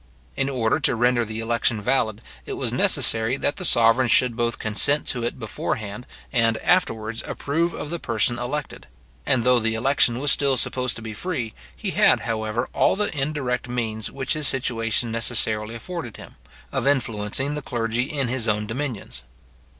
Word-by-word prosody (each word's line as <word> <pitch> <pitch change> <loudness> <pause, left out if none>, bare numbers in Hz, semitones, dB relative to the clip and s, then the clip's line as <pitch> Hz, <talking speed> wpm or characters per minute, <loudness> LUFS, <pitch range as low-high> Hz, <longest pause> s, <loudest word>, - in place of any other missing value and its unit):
In 135 - 0
order 125 +1 +1
to 140 - +2
render 120 +1 +2
the 110 0 -5
election 115 0 0
valid, 110 -1 0 0.2
it - - -4
was - - -3
necessary 115 +3 +2
that 145 - -1
the 185 - -5
sovereign 120 -4 +5
should 120 +1 +4
both 120 -1 -1
consent 125 +7 +1
to 125 - -1
it 120 - -2
before 110 -4 -3
hand, 110 +3 -7 0.3
and 115 -3 +3
afterwards 115 -11 +1
approve 165 +4 -1
of 150 - -6
the 170 - -3
person 120 -1 +1
elected; 135 +3 -5 0.4
and 125 -3 +2
though 125 0 +4
the 110 0 0
election 125 0 +2
was 145 +2 +3
still 140 -2 +2
supposed 125 -1 0
to 110 - -8
be 110 -1 -6
free, 125 - -3 0.2
he - - -3
had, - - +4
however 115 +1 -2
all - - +3
the 205 -4 -1
indirect 135 -4 -2
means 110 -3 -2
which 135 -1 -2
his 155 -2 +1
situation 115 -3 0
necessarily 115 -1 0
afforded 145 - -6
him, - - -12 0.4
of - - -1
influencing 130 0 0
the 150 - -3
clergy 120 0 -2
in 140 -4 -1
his 120 -1 -1
own 105 0 +1
dominions. 115 - -5
120 Hz, 175 wpm, -23 LUFS, 115-135 Hz, 0.4 s, sovereign